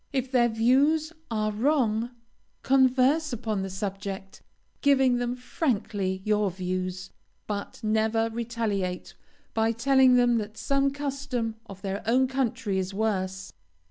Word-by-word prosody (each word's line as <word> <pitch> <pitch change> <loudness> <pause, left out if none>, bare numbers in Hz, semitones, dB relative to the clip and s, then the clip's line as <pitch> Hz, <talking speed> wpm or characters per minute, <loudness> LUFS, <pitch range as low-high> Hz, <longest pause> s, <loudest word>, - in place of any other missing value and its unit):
If 265 -2 -2
their 240 -2 +4
views 280 +8 +2 0.2
are 215 -2 0
wrong, 235 -1 +1 0.5
converse 270 +3 +3
upon 220 -4 -2
the 190 - -3
subject, 195 0 -5 0.4
giving 265 -3 +4
them 245 0 -1
frankly 205 - -2
your 210 -1 +2
views, 185 +1 -4 0.3
but 205 -1 -5
never 220 +1 +1
retaliate 220 -6 -3 0.4
by 225 0 +2
telling 260 +2 +4
them 245 -1 +4
that 215 +1 -6
some 275 +5 +1
custom 275 -5 -3
of 195 0 -11
their 195 +1 -3
own 255 +3 +4
country 250 -6 -1
is 190 +1 -4
worse. 190 -3 -2
225 Hz, 125 wpm, -27 LUFS, 200-260 Hz, 0.5 s, their